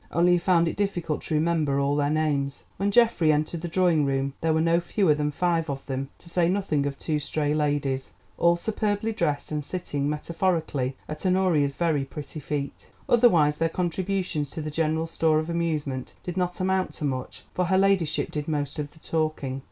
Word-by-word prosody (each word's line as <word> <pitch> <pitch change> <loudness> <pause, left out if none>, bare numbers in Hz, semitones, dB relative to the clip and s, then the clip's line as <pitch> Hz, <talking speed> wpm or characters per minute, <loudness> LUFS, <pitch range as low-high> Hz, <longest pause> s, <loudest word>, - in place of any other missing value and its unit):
Only 175 +2 +4
he 175 - +5
found 170 -1 +3
it - - -2
difficult 175 -6 -1
to 155 - -1
remember 155 -3 +1
all 140 +1 +1
their 145 -1 +1
names. 145 -3 0
When 200 +1 +1
Geoffrey 210 -8 +4
entered 155 +2 -1
the 175 - -3
drawing 170 -3 +3
room 135 0 0
there 160 - +2
were 160 - +2
no 165 +1 +3
fewer 175 -1 +2
than 150 0 0
five 165 +1 0
of 135 -1 -4
them, 135 0 -3
to - - -20
say 170 0 +2
nothing 180 -7 0
of 140 -1 -4
two 155 0 -1
stray 150 0 -1
ladies, 145 -3 0 0.3
all 170 0 +5
superbly 210 +3 -1
dressed 155 -10 -1
and 150 -1 -2
sitting 145 -4 -2
metaphorically 155 -4 -1
at 150 0 -6
Honoria's 180 -7 +2
very 160 -5 +1
pretty 145 +2 -7
feet. 145 -2 -5 0.2
Otherwise 170 -12 +4
their 165 0 +1
contributions 180 -3 -1
to 160 - -5
the 155 - -4
general 160 +1 0
store 160 -1 +2
of 155 +2 -1
amusement 150 -6 -2
did 175 - -5
not 180 -1 -1
amount 190 0 0
to 150 - -4
much, 130 -2 -4
for 180 - 0
her 190 +2 +2
ladyship 195 -5 +2
did 150 -1 -4
most 145 -1 -2
of 145 -1 -3
the 160 - -18
talking. 155 -5 -2
160 Hz, 195 wpm, -26 LUFS, 145-175 Hz, 0.3 s, he